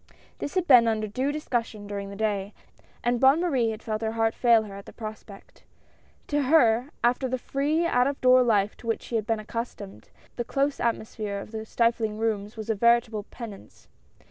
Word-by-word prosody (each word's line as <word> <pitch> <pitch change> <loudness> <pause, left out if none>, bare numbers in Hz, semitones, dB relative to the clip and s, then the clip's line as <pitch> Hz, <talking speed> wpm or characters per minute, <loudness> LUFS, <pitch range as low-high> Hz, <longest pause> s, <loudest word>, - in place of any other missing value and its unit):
This 285 - -5
had 370 -2 +1
been 245 -7 +7
under 220 -1 0
due 255 +7 -1
discussion 240 -8 -3
during 200 -1 -5
the 200 - -8
day, 205 -1 -2 0.5
and 240 0 +1
Bonne 270 +5 +5
Marie 270 -10 +1
had 220 0 -6
felt 215 -1 -3
her 220 0 -2
heart 225 0 +1
fail 235 -3 +4
her 205 -2 -9
at 200 0 -10
the - - -9
prospect. 215 -2 -10 0.6
To 290 0 0
her, 255 -3 +4
after 245 +2 +2
the 255 - -1
free 290 +6 0
out 250 -6 +3
of 280 0 -3
door 255 0 +6
life 210 -4 +2
to 230 - -12
which 225 - -1
she 235 - -5
had 215 -2 -1
been 225 -1 0
accustomed, 215 -2 -7 0.3
the 240 - -1
close 275 +3 -1
atmosphere 220 -3 -2
of 200 - -8
the 220 -1 -6
stifling 230 -2 0
rooms 215 -1 -2
was 220 0 -3
a - - +2
veritable 230 -1 +2
penance. 220 -5 -11
230 Hz, 195 wpm, -26 LUFS, 215-255 Hz, 0.6 s, been